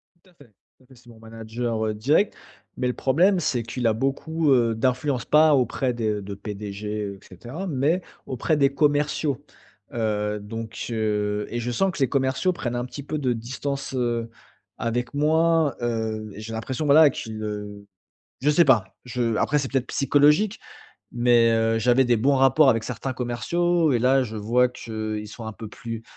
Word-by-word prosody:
Tout 170 +2 -27
à - - -25
fait. 145 -9 -20 0.3
Tout - - -25
à - - -24
fait, 130 - -18
c'est 120 0 -19
mon 115 -1 -15
manager, 115 0 -4
heu, 110 - -1
direct, 145 - +2 0.4
mais 125 - 0
le 125 - 0
problème, 180 +11 +2
c'est 130 -7 -1
qu'il 115 +1 -2
a 110 - +3
beaucoup, 140 +6 0
heu, 115 -3 +2
d'influence. 125 +2 0
Pas 155 0 +5
auprès 125 0 0
des, 120 -1 -3
heu 105 -1 -2
de 100 0 -7
PDG, 100 0 -7 0.3
heu, - - -17
et - - -20
cetera, 120 - -8
mais 155 +4 +1 0.3
auprès 140 +5 0
des 140 -1 +4
commerciaux. 145 -1 +1 0.5
Heu, 105 -2 -1
donc 110 +1 -6
heu 105 -2 -1
et 120 - -3
je 120 +1 -3
sens 190 +10 +1
que 170 - -8
les 135 -3 +2
commerciaux 135 +6 +1
prennent 120 -8 -4
un 120 - -1
petit 140 +3 -8
peu 155 +2 -3
de 130 -4 0
distance, 130 +4 -5
heu, 120 -2 -1 0.5
avec 120 +2 -2
moi, 160 0 +2
heu, 110 -2 -2
et 105 - -8
j'ai 115 +1 -7
l'impression, 125 +6 -3
voilà, 150 +1 +7
qu'ils, 110 -4 -6
heu 105 -1 -6 0.6
je 145 - +2
sais 165 +3 +5
pas. 110 -8 +2
Je 120 -2 -1
après, 145 +7 +1
c'est 135 -2 -3
peut-être 130 -1 0
psychologique, 150 - +3 0.5
mais 120 -1 +4
heu, 115 0 +2
j'avais 125 +3 +3
des 120 -1 +3
bons 140 +6 +3
rapports 135 +2 +5
avec 115 -3 +2
certains 130 +2 -4
commerciaux, 160 +7 0
et 120 - +2
là, 130 +3 +3
je 110 -3 -5
vois 120 +4 +2
qu'ils 110 -3 -5
sont 110 +1 -9
un 110 - -5
peu 110 - -8
plus, 115 0 -7
125 Hz, 195 wpm, -24 LUFS, 110-140 Hz, 0.6 s, voilà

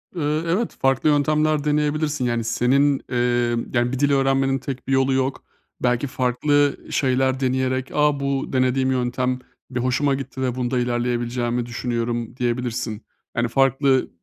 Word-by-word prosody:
Eee, 155 -1 0
evet, 200 +8 -1
farklı 135 +2 +3
yöntemler 150 +1 +2
deneyebilirsin. 150 -1 0
Yani, 120 -1 0
senin, 135 +5 +2
eee, 125 - 0 0.6
yani, 120 0 +1
bir 135 - -3
dil 145 0 +3
öğrenmenin 135 0 +2
tek 130 0 -6
bir 135 - 0
yolu 135 0 +3
yok. 130 0 -1 0.4
Belki 125 +2 +1
farklı 140 +3 +1
şeyler 130 -1 +1
deneyerek, 130 0 -1
"A, 150 -1 +2
bu 140 -1 -2
denediğim 130 0 +2
yöntem 125 0 -1 0.3
bir 125 - -3
hoşuma 130 +3 +1
gitti 135 -1 -6
ve 125 -2 -1
bunda 125 0 -1
ilerleyebileceğimi 120 0 -1
düşünüyorum." 120 0 -3
diyebilirsin. 120 -2 -2 0.3
Yani, 120 - +2
farklı, 135 +1 +2
130 Hz, 145 wpm, -22 LUFS, 125-140 Hz, 0.6 s, farklı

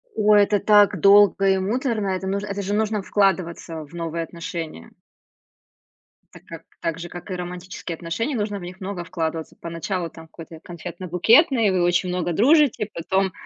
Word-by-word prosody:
Ой, 210 -1 +5
это 205 0 +1
так 205 0 +4
долго 200 0 +5
и 190 - +3
муторно, 220 +2 -1
это 190 0 -3
нуж 200 +1 -2
это 200 -1 -4
же 200 +1 -3
нужно 215 0 0
вкладываться 180 -5 -1
в 145 - -21
новые 165 -1 -3
отношения. 165 - -7 1.4
Так, - - -14
а - - -5
к - - -32 0.2
так 165 0 -2
же, 175 0 -7
как 175 +3 -10
и 185 - -2
романтические 180 -1 -6
отношения, 200 - -3
нужно 205 -2 -2
в - - -10
них 180 +2 -10
много 190 -2 -5
вкладываться. 165 -3 -4
Поначалу 170 +1 -4
там 160 +1 -13
какой-то 165 0 -12
и 160 - -12
конфетно-букетный, 185 - +2
вы 180 -1 +1
очень 175 +1 +1
много 180 -1 -2
дружите, 265 - +3
потом, 190 +3 0
185 Hz, 175 wpm, -22 LUFS, 170-205 Hz, 1.4 s, Ой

